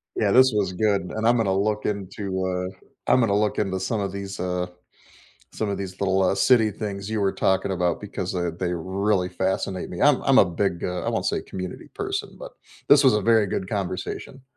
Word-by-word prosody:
Yeah, 100 -2 +1
this 130 0 +6
was 100 -3 +1
good, 100 +1 +1
and 110 +1 0
I'm 120 - +5
gonna 100 -4 +1
look 105 +2 0
into, 95 -1 -3
uh 90 0 -2 0.4
I'm 130 - +5
gonna 110 -5 +2
look 105 0 0
into 95 -2 -1
some 105 +3 -1
of 100 -1 -2
these, 100 -1 -6
uh 90 0 -2 0.9
some 110 - -2
of 100 -1 -2
these 95 -1 -7
little, 95 -1 +2
uh, 95 +1 +2
city 110 +2 +4
things 100 -1 -5
you 110 -1 -1
were 95 -1 +1
talking 95 +1 +1
about 90 -2 0
because 95 -3 -4
they 90 -2 -1
they 85 +2 -3
really 95 +2 0
fascinate 95 0 -2
me, 90 - -6
I'm 145 -2 +4
I'm 135 -1 +4
a - - +8
big, 90 0 -2
uh 90 0 -2
I - - -1
won't - - -1
say - - 0
community 95 -1 -7
person, 405 0 -4
but - - -9 0.4
this 145 -1 +7
was 130 -5 +5
a 105 - +2
very 110 0 +3
good 95 0 -3
conversation. 100 +6 -4
100 Hz, 215 wpm, -24 LUFS, 95-110 Hz, 0.9 s, a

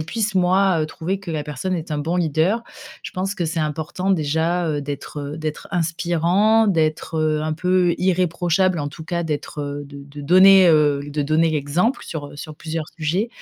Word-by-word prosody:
puisse 210 +6 -2
moi, 185 -1 +3
heu, 155 - 0
trouver 180 +5 -4
que 190 -3 -7
la 155 -2 -2
personne 150 +5 -3
est 165 -1 -5
un 150 - -1
bon 165 +4 -1
leader, 170 +6 +1 0.4
je - - -6
pense 190 +2 -2
que 175 - -2
c'est 165 +1 -2
important 155 +5 -2
déjà, 165 +1 +1
heu, 150 -2 -1
d'être, 145 +1 -6 0.2
heu, - - -8
d'être 155 -1 -5
inspirant, 175 +5 +2
d'être, 160 -3 0
heu, 155 -1 +1
un 155 0 -1
peu 180 +1 +2
irréprochable 180 0 +1
en 145 -1 -2
tout 160 +2 -10
cas, 170 +1 -2
d'être, 150 -2 -4
heu, 145 0 -4
de 140 0 -11
de 145 +1 -11
donner, 185 +4 +7
heu, 150 -3 +4
l 145 - -8
de 150 0 0
donner 155 +3 +2
l'exemple 155 - 0
sur, 145 -3 -6
heu, - - -13
sur 155 +1 -8
plusieurs 160 -1 -5
sujets. 170 +8 -1
165 Hz, 200 wpm, -21 LUFS, 150-185 Hz, 0.4 s, donner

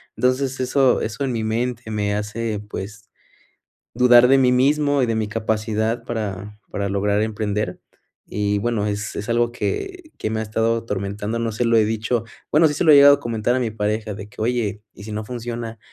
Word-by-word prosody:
Entonces 130 +1 0
eso 130 0 +3
eso 115 +6 -3
en 130 - -2
mi 110 -1 -2
mente 115 +1 -2
me 105 -1 -1
hace, 105 0 -3
pues, 100 +1 -7 0.8
dudar 125 0 +6
de 135 +1 +5
mí 125 -1 +4
mismo 145 +2 +3
y - - +3
de 115 -1 -1
mi 110 -1 -1
capacidad 110 +1 -1
para 105 -1 -5
para 100 -1 -3
lograr 100 +1 +1
emprender 105 -1 -2 0.5
y, 105 0 0
bueno, 110 -1 -1
es 105 0 -3
es 105 +3 -5
algo 120 0 +2
que 370 - -4
que 110 - -3
me 110 0 -2
ha - - -2
estado 115 +2 0
atormentando. 105 +1 -3
No 115 -1 -1
se 120 - -1
lo 115 0 +4
he 110 - +4
dicho 110 +1 -1 0.3
Bueno, 155 +2 +5
sí 150 - -2
se 165 - -1
lo 155 - +6
he - - +9
llegado 140 0 +9
a - - -13
comentar 120 0 0
a - - +1
mi 115 -3 -1
pareja, 105 0 -2
de 100 0 -8
que, 105 - -10
oye, 110 -3 -1
¿y 100 - -12
si 110 - -8
no 105 +1 -3
funciona? 115 -1 -6
110 Hz, 205 wpm, -21 LUFS, 105-125 Hz, 0.8 s, he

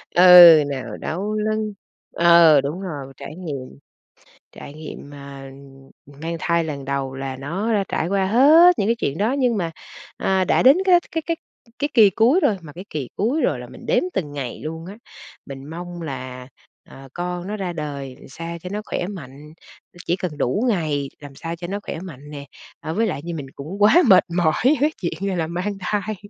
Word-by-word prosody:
Ừ, 175 -3 +10
nào 130 -2 -5
đau 200 +6 -4
lưng 215 0 -1 0.4
ờ, 170 -4 +6
đúng 150 +7 -4
rồi, 140 -7 -7
trải 155 - -9
nghiệm, 140 - -7 0.7
trải 140 - -11
nghiệm, 150 -2 -10
à, 140 -1 -10 0.7
mang 165 +1 -3
thai 170 -1 +1
lần 140 -3 -6
đầu 135 -1 -3
là 135 -1 -5
nó 195 +9 -1
trải 165 - -2
qua 195 0 +1
hết 310 - +6
những 200 - +1
cái 230 - +2
chuyện 145 -9 -3
đó 215 +5 +1
nhưng 250 -5 +1
mà, 165 -3 -2 0.5
à, 190 -1 +1
đã - - +2
đến 270 +6 +7
cái 355 -2 +6
cái 325 - -2
cái 335 -1 -1 0.4
cái 290 +1 0
kỳ 215 -5 +7
cuối 235 - +3
rồi, 205 - +1
mà 150 -3 -12
cái 185 +3 -10
kỳ 140 -5 -4
cuối 250 +10 0
rồi - - 0
là - - -9
mình - - -13
đếm - - +2
từng 150 -6 -3
ngày 135 -4 -5
luôn 160 +2 -6
á. 200 +4 -10 0.5
Mình 135 -1 -9
mong 175 +1 -7
là, 130 -3 -7 0.4
à, 135 0 -14
con 180 +1 -4
nó 210 +1 -4
ra 180 -3 -4
đời 140 -4 -6
làm - - -14
sao 170 +4 -7
cho 180 - -7
nó 210 +1 -3
khoẻ 175 - -3
mạnh, 150 -5 -10 0.5
chỉ 175 - +1
cần 175 -6 -5
đủ 130 - 0
ngày, 150 -8 -1
làm 145 -2 -12
sao 165 +3 -5
cho 175 +1 -7
nó 200 +3 -3
khoẻ - - -6
mạnh 150 -6 -10
nè, 140 -1 -8 0.3
à, 160 - -5
với 225 +3 +1
lại 145 - -3
như 170 0 -5
mình 140 -3 -7
cũng 175 +9 -8
quá 210 +10 +6
mệt 185 -3 +7
mỏi 160 -3 +3 0.3
với 300 +2 +3
chuyện, 195 +3 -3
à, 185 - -2
là 160 -2 -1
mang 185 +4 -3
thai, 210 +3 -2
170 Hz, 205 wpm, -21 LUFS, 145-200 Hz, 0.7 s, Ừ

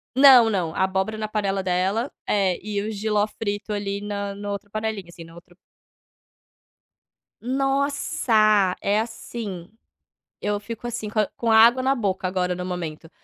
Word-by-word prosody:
Não, 260 -4 +8
não, 175 -5 -1
a 190 - +2
abóbora 190 +3 -1
na 215 0 -3
panela 200 -2 -1
dela 190 +7 0 0.2
é, 195 -3 +1
e 205 -1 -3
o 215 - -3
jiló 210 0 0
frito 210 -1 -4
ali 200 0 -3
na 200 -1 -4
na 205 0 -6
outra 205 0 -6
panelinha, 215 -3 -3
assim, 170 -1 -11
na 165 0 -15
outra 175 +1 -16 1.8
Nossa! 250 -7 +2
É, 205 +2 +1
assim, 220 -5 -6 0.7
eu 205 0 -1
fico, 230 +2 -7
assim, 220 -3 -4
com 215 - -1
a 210 - +2
com 230 -1 0
a 220 - +6
água 240 +3 +6
na 270 +1 +3
boca 190 -5 -1
agora 180 -1 -1
no 180 0 -5
momento, 165 -3 -5
205 Hz, 165 wpm, -23 LUFS, 190-220 Hz, 1.8 s, Não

